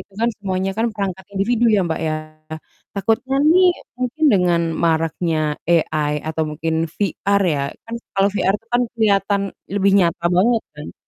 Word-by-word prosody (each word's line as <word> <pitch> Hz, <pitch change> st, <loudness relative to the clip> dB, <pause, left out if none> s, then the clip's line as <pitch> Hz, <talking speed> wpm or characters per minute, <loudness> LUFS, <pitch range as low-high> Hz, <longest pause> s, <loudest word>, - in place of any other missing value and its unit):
itu 200 Hz, -, -16 dB
kan 235 Hz, -, +3 dB
semuanya 190 Hz, -1 st, -2 dB
kan 225 Hz, +1 st, +1 dB
perangkat 190 Hz, -2 st, -4 dB
individu 220 Hz, +5 st, +1 dB
ya, -, -, +4 dB
Mbak, 160 Hz, -, -2 dB
ya? -, -, -1 dB, 0.8 s
Takutnya 225 Hz, +7 st, 0 dB, 0.2 s
nih 370 Hz, +1 st, +5 dB, 0.3 s
mungkin 255 Hz, +5 st, -2 dB
dengan 180 Hz, -3 st, +3 dB, 0.2 s
maraknya 165 Hz, 0 st, +1 dB, 0.3 s
AI 155 Hz, -3 st, +1 dB, 0.2 s
atau 160 Hz, 0 st, -1 dB
mungkin 160 Hz, +1 st, -2 dB, 0.2 s
VR 200 Hz, 0 st, 0 dB
ya, 140 Hz, -, -1 dB, 0.2 s
kan 230 Hz, -, -7 dB, 0.2 s
kalau 195 Hz, +1 st, +4 dB
VR 195 Hz, -1 st, +1 dB
tuh 225 Hz, -, -34 dB
kan 245 Hz, -, +4 dB
kelihatan 200 Hz, -2 st, +2 dB, 0.3 s
lebih 200 Hz, -1 st, +3 dB
nyata 170 Hz, -1 st, +1 dB
banget 225 Hz, +4 st, +3 dB
kan? 150 Hz, +1 st, -9 dB
195 Hz, 155 wpm, -20 LUFS, 170-220 Hz, 0.8 s, nih